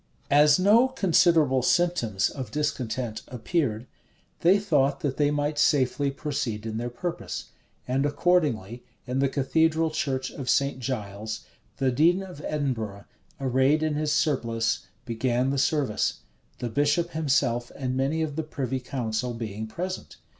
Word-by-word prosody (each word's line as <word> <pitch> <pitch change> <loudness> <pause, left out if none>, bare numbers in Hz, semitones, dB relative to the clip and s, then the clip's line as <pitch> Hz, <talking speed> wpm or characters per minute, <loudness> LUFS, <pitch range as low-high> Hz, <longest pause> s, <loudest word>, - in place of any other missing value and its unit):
As 145 +1 +6
no 215 +7 +5
considerable 170 - +3
symptoms 125 - +1
of 130 -5 -6
discontent 120 -5 -2
appeared, 125 -2 -1 0.5
they 180 +4 +5
thought 145 -9 +1
that 140 -3 -2
they 145 -1 +3
might 145 0 -1
safely 140 -1 +2
proceed 130 -7 -3
in 110 -1 -3
their 120 +1 -3
purpose; 170 +8 -5 0.4
and 130 +2 +1
accordingly, 145 - +1 0.2
in 130 0 -2
the 135 0 +2
cathedral 160 +4 +2
church 130 -4 -2
of 130 -3 -6
St. 140 -1 +2
Giles, 110 -4 -4 0.4
the 130 -1 +1
dean 170 +9 +3
of 180 -6 -10
Edinburgh, 115 -9 -3 0.3
arrayed 135 +3 +2
in 155 -1 +1
his 150 0 -1
surplice, 115 -7 0 0.2
began 125 +2 0
the 140 - 0
service; 140 -6 0 0.4
the 120 - -3
bishop 145 +7 +1
himself 130 -6 0
and 130 -2 -2
many 140 +5 0
of 150 -3 -4
the 160 - -1
privy 135 -4 -3
council 125 -2 -3
being 110 -1 -5
present. 185 +10 -5
135 Hz, 140 wpm, -26 LUFS, 120-155 Hz, 0.5 s, As